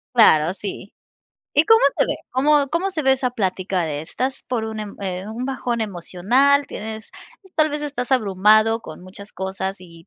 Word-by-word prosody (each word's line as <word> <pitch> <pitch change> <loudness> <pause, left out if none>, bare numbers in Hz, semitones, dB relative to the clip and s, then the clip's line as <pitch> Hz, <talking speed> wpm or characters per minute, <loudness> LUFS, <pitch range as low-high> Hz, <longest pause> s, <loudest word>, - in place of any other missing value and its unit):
Claro, 165 -7 +5
sí, 200 0 -7 0.6
¿y 295 +2 +4
cómo 450 +3 +6 0.2
se - - +3
ve? - - -1
¿Cómo 280 +2 +3
cómo 360 +4 0
se 315 -4 -3
ve 265 0 +4
esa 255 -1 0
plática 190 -4 -1
de 150 -1 -3
estás 260 +10 -4
por 245 -3 -1
un, 220 0 -5
em, 210 -1 -7 0.4
un 245 - -4
bajón 250 -3 -2
emocional, 220 +9 +1
tienes, 220 -1 -7 0.3
pues, 380 -2 -21
tal 310 -1 +2
vez 295 0 -3
estás 270 -3 -3
abrumado 215 0 +3
con 160 -3 -11
muchas 200 +2 -12
cosas 190 0 -4
y 170 -1 -15
220 Hz, 180 wpm, -21 LUFS, 190-270 Hz, 0.6 s, cómo